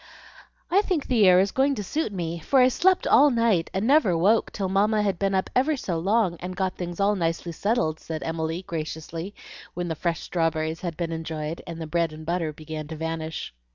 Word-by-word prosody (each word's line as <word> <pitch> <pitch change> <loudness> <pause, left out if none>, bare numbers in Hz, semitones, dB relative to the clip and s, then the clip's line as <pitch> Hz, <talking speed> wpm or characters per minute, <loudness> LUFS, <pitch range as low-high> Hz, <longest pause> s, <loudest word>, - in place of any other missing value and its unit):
"I 390 +3 +5
think 360 -8 -1
the 225 -6 +4
air 180 0 +7
is 195 +1 +2
going 275 +1 +2
to 210 - -4
suit 295 +4 -2
me, 170 -3 -3
for 265 - +2
I 255 0 +6
slept 370 +8 +2
all 290 +1 +6
night 230 -9 +2
and 195 +3 -1
never 255 - +4
woke 205 +7 +3
till 195 -3 -2
Mamma 210 +3 +2
had 195 -4 -1
been 195 -1 +1
up 190 - +1
ever 285 +4 +2
so 175 -9 -2
long 195 -1 +1
and 180 +1 -6
got 185 0 -1
things 175 0 -6
all 200 +1 +3
nicely 170 -1 -2
settled," 165 -3 0
said 160 -1 -5
Emily, 165 +2 -3
graciously, 165 +3 -5 0.4
when 175 -1 -3
the 160 - -2
fresh 170 +1 -2
strawberries 160 -1 -1
had 170 -3 -4
been 170 -2 -2
enjoyed, 160 -1 -4
and 170 -1 -6
the 160 - -4
bread 165 0 0
and 155 0 -10
butter 170 -1 -1
began 155 0 -7
to 160 - -6
vanish. 160 - -4
175 Hz, 215 wpm, -25 LUFS, 165-210 Hz, 0.4 s, air